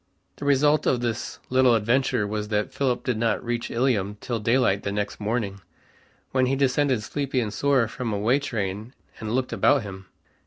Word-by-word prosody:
The 145 - -6
result 145 +2 +3
of 125 - +2
this 120 -1 -3
little 130 -2 +5
adventure 115 0 +1
was 105 0 -3
that 105 +4 -1
Philip 130 -2 0
did 120 -4 -1
not 115 0 0
reach 120 0 -2
Ilium 105 -5 0
till 120 -2 -3
daylight 115 -3 +2
the 100 - -3
next 105 0 -3
morning, 105 -2 -2 0.7
when 130 -1 +2
he 135 - +1
descended 135 -3 +1
sleepy 135 +2 -2
and 110 -4 -2
sore, 135 0 +2
from 115 +1 -4
a 105 - -1
way 115 +7 +2
train, 110 -3 -4 0.2
and 110 +1 -3
looked 130 -1 -1
about 140 -5 +3
him. 95 -2 -9
120 Hz, 185 wpm, -25 LUFS, 105-130 Hz, 0.7 s, little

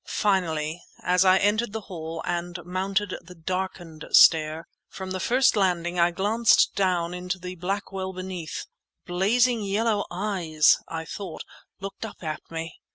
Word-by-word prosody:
Finally, 170 -5 0 0.2
as 180 +1 +3
I 185 0 +6
entered 210 +3 +1
the 220 - -3
hall 165 -4 -6
and 175 0 -2
mounted 190 +2 -1
the 180 +1 -13
darkened 175 -2 -4
stair, 160 0 +5 0.2
from 190 -1 -7
the 185 - -2
first 255 +5 +3
landing 180 -3 +1
I 170 0 +5
glanced 210 +6 +3
down 180 -3 0
into 180 +1 -3
the 180 0 -7
black 195 +4 -3
well 190 -1 -3
beneath. 185 -3 -6 0.4
Blazing 225 +6 +2
yellow 205 +1 0
eyes, 175 -5 +2
I 165 0 -5
thought, 180 -2 -6 0.4
looked 195 +2 -7
up 220 -4 -8
at 155 -1 -3
me! 165 0 -6
185 Hz, 150 wpm, -26 LUFS, 170-200 Hz, 0.4 s, I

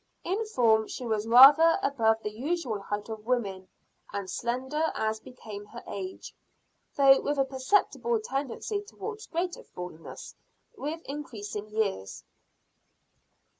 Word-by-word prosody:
In 405 +5 -1
form 220 - +3
she 250 - -6
was 220 -1 -1
rather 280 +8 +9
above 225 -5 +2
the 210 - -3
usual 255 -1 -2
height 205 +1 -4
of 220 -1 -7
women, 200 -7 -1 0.4
and 200 -1 -4
slender 260 - -1
as 220 0 -1
became 215 -4 -10
her 235 +3 -10
age; 190 -1 -6 0.6
though 270 -1 +6
with 290 0 -1
a 270 - +3
perceptible 405 - +1
tendency 290 - -3
towards 430 +1 -8
greater 345 +1 -2
fullness 180 -2 -9 0.4
with 320 -1 -5
increasing 215 -7 -6
years. 200 - -2
245 Hz, 125 wpm, -28 LUFS, 210-295 Hz, 0.6 s, rather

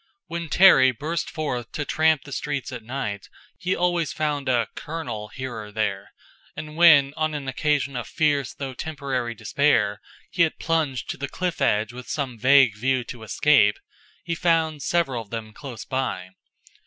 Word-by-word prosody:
When 170 -1 -5
Terry 185 -8 +7
burst 155 +7 -3
forth 125 -7 -4
to 145 - -3
tramp 155 -2 +2
the 140 - -12
streets 140 -1 -3
at 125 -2 -6
night 110 -5 -5 0.3
he 185 0 0
always 175 -3 0
found 145 -3 -2
a 120 -2 +2
"Colonel" 125 -10 -5
here 130 +3 -6
or 105 -2 -7
there; 100 -3 -2 0.4
and 150 0 -7
when, 155 -5 +6
on 155 -1 -1
an 140 -2 -5
occasion 140 0 0
of 120 - -4
fierce 145 -5 +1
though 135 -2 -5
temporary 130 -5 -3
despair, 105 -6 +1 0.3
he - - 0
had 165 -2 +2
plunged 155 -6 -1
to - - -7
the 140 0 -4
cliff 180 -2 -3
edge 105 +3 +1
with 125 0 -10
some 130 -6 -3
vague 130 -2 +5
view 130 +3 0
to 120 -1 -9
escape, 110 -1 +3 0.5
he 170 - -2
found 165 -3 +1
several 135 -6 0
of 110 - -14
them 110 -1 -6
close 130 -3 -8
by. 130 -9 -3
135 Hz, 170 wpm, -24 LUFS, 120-155 Hz, 0.5 s, Terry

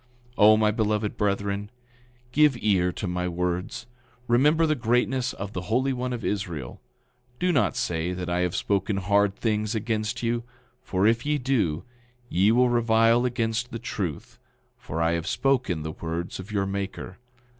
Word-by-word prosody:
9:40 - - -31
O, 110 +1 +7
my 110 -1 +3
beloved 105 -1 0
brethren, 100 0 -1 0.6
give 145 -1 +4
ear 95 -4 +2
to 100 - -5
my 90 0 -2
words. 90 +5 -3 0.4
Remember 150 +7 +4
the 155 - +2
greatness 125 0 +1
of 100 +1 -6
the 95 - -3
Holy 130 +4 +2
One 125 0 -3
of 120 -3 -4
Israel. 85 -11 -4 0.6
Do 180 +4 +1
not 145 - +2
say 90 -8 -1
that 90 -1 -4
I 85 0 0
have 90 -1 0
spoken 100 0 0
hard 100 +1 +2
things 110 -1 -1
against 110 +1 -2
you; 120 0 0 0.4
for 95 +1 0
if 115 +2 +3
ye 150 0 +1
do, 120 - 0 0.5
ye 95 +5 +3
will 125 +2 +4
revile 115 0 +3
against 115 -1 -1
the 115 - -5
truth; 95 -9 -5 0.4
for 80 +2 -4
I 80 - +2
have 85 +1 -2
spoken 125 - 0
the 80 - -4
words 85 +3 -5
of 95 +3 -8
your 100 -2 0
Maker. 95 0 -5
105 Hz, 165 wpm, -26 LUFS, 90-120 Hz, 0.6 s, O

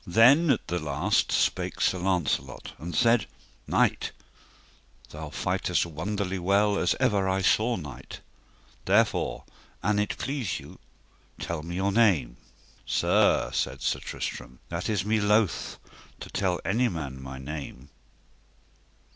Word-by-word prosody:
Then 125 - +6
at 130 - +2
the 90 - -1
last 75 -3 0
spake - - 0
Sir 95 - +2
Launcelot 85 -8 -1
and 85 +1 -6
said: 115 +4 +3 0.4
Knight, - - +1 1.0
thou 75 0 -7
fightest 90 +1 0
wonderly 95 +4 -3
well 100 +3 +2
as 90 - +2
ever 105 -7 +2
I 95 0 0
saw 115 +5 +3
knight, 70 -7 -8 0.7
therefore, - - +2 0.4
an 105 +2 +2
it 105 - -1
please 130 - -2
you, - - -13 0.6
tell 85 -2 -3
me 85 +2 -6
your 95 +2 +1
name. 90 - +3 0.5
Sir, - - +2
said - - -2
Sir - - 0
Tristram, 65 - -6
that 85 +5 -3
is 100 -3 0
me 110 +1 +2
loath 105 -2 +1 0.4
to - - -8
tell 90 -3 0
any 120 +5 +2
man 70 -7 -5
my 65 0 -7
name. 70 -1 -7
95 Hz, 130 wpm, -27 LUFS, 75-105 Hz, 1.0 s, Then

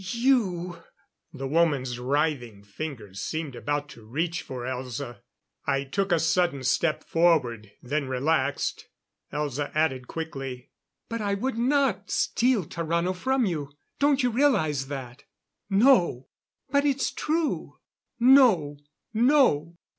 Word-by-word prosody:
"You 200 -9 +1 0.3
" - - -56
The 135 -2 -5
woman's 140 -5 +1
writhing 125 -5 -1
fingers 105 -3 -7
seemed 155 -5 -4
about 145 +2 -2
to 120 -5 -13
reach 165 +9 -2
for 125 -2 -7
Elza. 125 -2 -5 0.5
I 135 0 +1
took 195 +8 -2
a 170 - +5
sudden 170 -4 +1
step 155 +4 +1
forward, 130 -11 +1
then 140 +2 -1
relaxed. 140 +2 0 0.4
Elza 145 -1 -2
added 130 -5 0
quickly: 135 -6 -6 0.4
"But 230 -1 -4
I 200 -1 0
would 240 +3 -2
not 245 -7 +1
steal 240 -7 +1
Tarrano 170 +3 -1
from 260 +6 +1
you. 150 -7 -3 0.3
Don't 280 -2 +3
you 245 - +2
realize 160 - +2
that?" 130 -3 -7 0.4
"No!" 195 - +4 0.4
"But 280 +1 +3
it's 275 -2 +1
true." 315 0 -2 0.4
"No! 235 - +5 0.4
No! 220 - +3
160 Hz, 125 wpm, -26 LUFS, 135-215 Hz, 0.5 s, a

